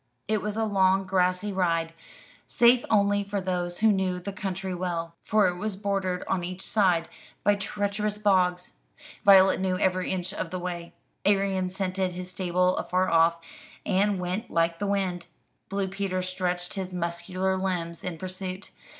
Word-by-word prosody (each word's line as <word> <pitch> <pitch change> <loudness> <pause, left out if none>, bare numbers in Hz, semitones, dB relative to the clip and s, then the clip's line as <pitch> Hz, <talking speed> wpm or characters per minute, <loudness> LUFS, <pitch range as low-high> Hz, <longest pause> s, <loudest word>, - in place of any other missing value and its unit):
It 215 -1 +1
was 210 0 -3
a 225 - +1
long 195 -2 +3
grassy 185 +2 +1
ride, 165 -3 0 0.5
safe 240 +1 +5
only 205 -1 +3
for 200 0 -3
those 180 -1 -3
who 220 -1 +6
knew 190 -2 0
the 195 +2 -6
country 190 -1 -4
well, 170 -2 -3
for 210 -2 +3
it 180 0 -2
was 210 +1 -3
bordered 195 -2 -1
on 180 -2 0
each 185 +1 -5
side 180 -6 +2 0.4
by 205 - +5
treacherous 205 +1 -2
bogs. 185 - +1 0.5
Violet 190 -1 +7
knew 185 -1 0
every 185 0 +1
inch 185 0 -2
of 185 - -4
the 185 - -4
way. 175 -1 -5 0.3
Arion 195 -2 +2
scented 185 -1 -2
his 180 +1 -7
stable 180 0 +1
afar 185 +1 0
off, 165 0 +4 0.5
and 200 +1 +2
went 185 +6 -3
like 165 0 +1
the 205 - -1
wind; 185 -3 -1 0.4
Blue 195 0 -1
Peter 190 -1 -2
stretched 180 -1 -2
his 190 -2 -4
muscular 180 +2 -2
limbs 180 -3 -2
in 180 -3 -4
pursuit. 185 +2 -6
185 Hz, 160 wpm, -27 LUFS, 180-200 Hz, 0.5 s, Violet